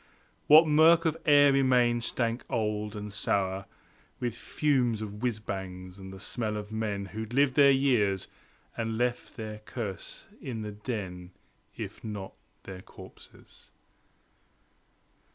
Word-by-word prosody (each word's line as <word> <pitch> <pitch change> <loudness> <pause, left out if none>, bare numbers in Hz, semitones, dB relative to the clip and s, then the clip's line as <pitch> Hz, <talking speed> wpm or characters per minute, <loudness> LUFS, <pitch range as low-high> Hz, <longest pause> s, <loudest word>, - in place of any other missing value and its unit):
What 155 +2 +8
murk 160 +3 +6
of 160 -1 +2
air 145 -1 +7
remained 125 -3 +3
stank 115 +1 -1
old, 105 -3 -1
and 105 -1 -6
sour 95 -2 -1 0.5
With 120 -3 -2
fumes 125 -2 0
of 105 -1 -7
whizz 120 -4 -1
bangs, 95 -2 -6
and 95 0 -9
the 95 - -10
smell 110 +1 -2
of 105 0 -7
men 105 -2 -2
Who'd 110 +4 -6
lived 140 -1 +4
there 140 0 +6
years, 115 -9 +2 0.5
and 115 -1 -2
left 120 0 -2
their 110 -2 -6
curse 105 -3 -6 0.2
in 115 -4 -5
the 105 - -5
den, 95 -5 -6 0.4
If - - -7
not 105 -3 -6 0.3
their 95 -1 -8
corpses. - - -16
110 Hz, 135 wpm, -29 LUFS, 100-125 Hz, 0.5 s, What